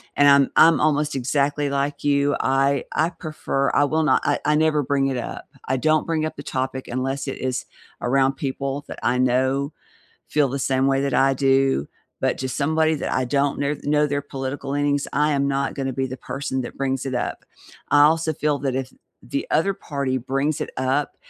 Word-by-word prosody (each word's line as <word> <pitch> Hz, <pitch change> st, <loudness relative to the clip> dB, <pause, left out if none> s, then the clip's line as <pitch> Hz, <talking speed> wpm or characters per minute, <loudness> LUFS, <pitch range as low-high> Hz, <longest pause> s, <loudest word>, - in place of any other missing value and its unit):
and 145 Hz, -, +4 dB
I'm 140 Hz, -1 st, +5 dB
I'm 165 Hz, -1 st, +6 dB
almost 150 Hz, -1 st, +1 dB
exactly 140 Hz, +2 st, 0 dB
like 140 Hz, +1 st, -2 dB
you, 145 Hz, 0 st, +2 dB
I 135 Hz, +1 st, +1 dB
I 160 Hz, -, +2 dB
prefer 155 Hz, -5 st, -2 dB
I -, -, +4 dB
will 155 Hz, +2 st, +1 dB
not 155 Hz, -, +3 dB
I 145 Hz, 0 st, +1 dB
I 150 Hz, +1 st, +3 dB
never 155 Hz, -1 st, +2 dB
bring 135 Hz, 0 st, +1 dB
it 135 Hz, -2 st, -1 dB
up. 120 Hz, -, -6 dB, 0.2 s
I 130 Hz, -, +1 dB
don't 155 Hz, +4 st, +1 dB
bring 160 Hz, -1 st, 0 dB
up 155 Hz, -, -5 dB
the 145 Hz, -, -7 dB
topic 130 Hz, -1 st, -3 dB
unless 135 Hz, +3 st, -3 dB
it 135 Hz, -, -4 dB
is 130 Hz, -1 st, -2 dB, 0.3 s
around 135 Hz, +2 st, +2 dB
people 140 Hz, +1 st, -3 dB
that -, -, -8 dB
I 125 Hz, -, +2 dB
know 130 Hz, +3 st, +1 dB, 0.5 s
feel 150 Hz, -2 st, +2 dB
the 135 Hz, +2 st, -3 dB
same 130 Hz, 0 st, +1 dB
way 135 Hz, 0 st, +2 dB
that 140 Hz, -2 st, -1 dB
I 135 Hz, +1 st, +4 dB
do, 135 Hz, -, +2 dB, 0.3 s
but -, -, 0 dB
to 130 Hz, -, -3 dB
somebody 155 Hz, +4 st, +1 dB
that 150 Hz, -, -3 dB
I 130 Hz, -, +1 dB
don't 140 Hz, +2 st, 0 dB
kne 145 Hz, +1 st, -2 dB
know 150 Hz, 0 st, +2 dB
their 145 Hz, 0 st, -2 dB
political 135 Hz, 0 st, -5 dB
leanings, 145 Hz, 0 st, 0 dB
I 150 Hz, +1 st, +2 dB
am 140 Hz, -1 st, +1 dB
not 140 Hz, 0 st, -1 dB
gonna 135 Hz, -2 st, -2 dB
be 130 Hz, +1 st, -1 dB
the 130 Hz, 0 st, -6 dB
person 130 Hz, -1 st, -4 dB
that 120 Hz, -, -8 dB
brings 135 Hz, -1 st, -1 dB
it 130 Hz, -, -3 dB
up. 125 Hz, -, -3 dB, 0.5 s
I 145 Hz, -, +6 dB
also 160 Hz, +1 st, +3 dB
feel 150 Hz, -1 st, 0 dB
that 135 Hz, -2 st, -1 dB
if 130 Hz, 0 st, -3 dB, 0.3 s
the 140 Hz, -, -3 dB
other 195 Hz, +5 st, +2 dB
party 140 Hz, -8 st, -3 dB
brings 135 Hz, +4 st, -1 dB
it -, -, -6 dB
up, 130 Hz, +3 st, 0 dB
140 Hz, 205 wpm, -23 LUFS, 135-145 Hz, 0.5 s, I'm